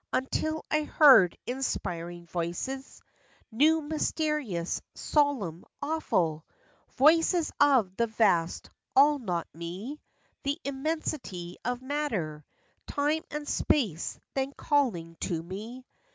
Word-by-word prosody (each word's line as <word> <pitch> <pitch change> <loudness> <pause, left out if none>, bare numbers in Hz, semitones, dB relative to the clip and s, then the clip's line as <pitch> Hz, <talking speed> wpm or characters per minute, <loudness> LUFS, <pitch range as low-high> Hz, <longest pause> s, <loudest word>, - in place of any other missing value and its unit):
Until 315 +4 -1
I 305 - +3
heard 265 - +7
inspiring 175 -9 -3
voices, 175 +11 -4 0.5
New, 310 +8 +4
mysterious, 300 - -1
solemn, 255 - 0 0.2
awful; 175 - 0 0.5
Voices 325 +4 +4
of 240 -10 +4
the 235 - +2
vast 195 -7 +1 0.2
"All 290 +2 +6
not 180 -8 -2
me 185 - -6 0.2
"— - - -41
The 280 +2 0
immensity 270 - -3
of 245 +1 -2
matter, 220 - -2 0.4
Time 295 +2 0
and 300 0 -5
space—then 265 - -1
calling 180 - 0
to 165 -3 -2
me! 220 +8 -8
255 Hz, 100 wpm, -29 LUFS, 175-295 Hz, 0.5 s, heard